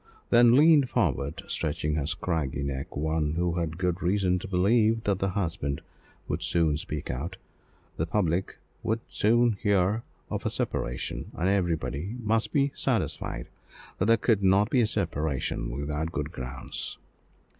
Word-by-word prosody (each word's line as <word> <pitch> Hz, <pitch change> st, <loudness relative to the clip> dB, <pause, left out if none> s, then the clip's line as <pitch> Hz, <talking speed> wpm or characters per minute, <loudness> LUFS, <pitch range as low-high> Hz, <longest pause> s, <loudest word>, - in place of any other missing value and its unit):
Then 120 Hz, 0 st, +7 dB
leaned 150 Hz, -2 st, +6 dB
forward, 75 Hz, -, 0 dB
stretching 75 Hz, -1 st, -1 dB
her 75 Hz, -2 st, -1 dB
scraggy 80 Hz, -5 st, -1 dB
neck, 70 Hz, -1 st, -4 dB
one 80 Hz, 0 st, 0 dB
who 85 Hz, 0 st, 0 dB
had 80 Hz, -1 st, -2 dB
good 90 Hz, 0 st, -1 dB
reason 90 Hz, 0 st, +2 dB
to 110 Hz, -, -7 dB
believe 110 Hz, +4 st, +3 dB
that 100 Hz, -4 st, +1 dB
the 95 Hz, -, +1 dB
husband 80 Hz, -7 st, -2 dB, 0.5 s
would -, -, -2 dB
soon 80 Hz, -3 st, +2 dB
speak 75 Hz, -1 st, -4 dB
out 80 Hz, +9 st, -4 dB, 0.6 s
the 80 Hz, -, -1 dB
public 90 Hz, -1 st, 0 dB, 0.2 s
would 110 Hz, +1 st, -1 dB
soon 115 Hz, 0 st, +3 dB
hear 100 Hz, +2 st, +2 dB, 0.3 s
of -, -, -2 dB
a -, -, 0 dB
separation: -, -, -3 dB
and 90 Hz, -, 0 dB
everybody 85 Hz, -, 0 dB
must 110 Hz, -1 st, 0 dB
be 140 Hz, -2 st, +2 dB
satisfied -, -, -2 dB, 0.5 s
that 95 Hz, -, +2 dB
there 115 Hz, 0 st, +6 dB
could 110 Hz, -2 st, +2 dB
not 100 Hz, +3 st, +4 dB
be 130 Hz, -, +4 dB
a 110 Hz, -, +3 dB
separation 75 Hz, -, -1 dB
without 75 Hz, +5 st, -3 dB
good 75 Hz, -2 st, -3 dB
grounds. 65 Hz, -3 st, -4 dB
90 Hz, 150 wpm, -28 LUFS, 75-105 Hz, 0.6 s, Then